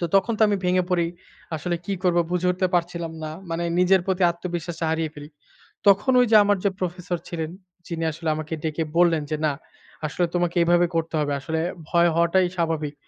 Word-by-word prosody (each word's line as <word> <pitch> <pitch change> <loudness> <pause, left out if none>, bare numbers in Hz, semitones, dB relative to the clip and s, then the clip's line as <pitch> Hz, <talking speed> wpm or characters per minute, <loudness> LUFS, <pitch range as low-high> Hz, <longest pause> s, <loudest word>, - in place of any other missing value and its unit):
তো - - -1
তখন 195 +4 +2
তো - - +3
আমি 205 - +2
ভেঙে 180 0 +3
পড়ি। 175 -2 +2 0.5
আসলে 175 +3 -2
কি 200 - -1
করব 175 -1 +3
বুঝে 180 0 +1
উঠতে 185 +1 +1
পারছিলাম 170 -1 -1
না। 155 - -4 0.2
মানে 165 +1 -2 0.2
নিজের 185 +1 +5
প্রতি 190 0 0
আত্মবিশ্বাসটা 170 -1 -5
হারিয়ে 160 -1 -1
ফেলি। 145 0 -10 0.6
তখন 200 +6 +5
ওইযে 230 -3 +3
আমার 205 0 +2
যে - - +5
প্রফেসর 180 0 -3
ছিলেন। 160 -2 -4 0.4
যিনি 165 -2 -3
আসলে 160 +1 -4
আমাকে 155 +1 -5
ডেকে 160 0 -1
বললেন 170 -3 +4
যে 155 - 0
না 145 - +2 0.5
আসলে 175 +4 0
তোমাকে 175 0 0
এভাবে 175 +1 +4
করতে 165 0 -1
হবে। 145 -1 0
আসলে 160 +3 -3 0.3
ভয় 170 0 +4
হওয়াটাই 170 +2 +3
স্বাভাবিক। 160 -3 -1
170 Hz, 190 wpm, -24 LUFS, 165-180 Hz, 0.6 s, নিজের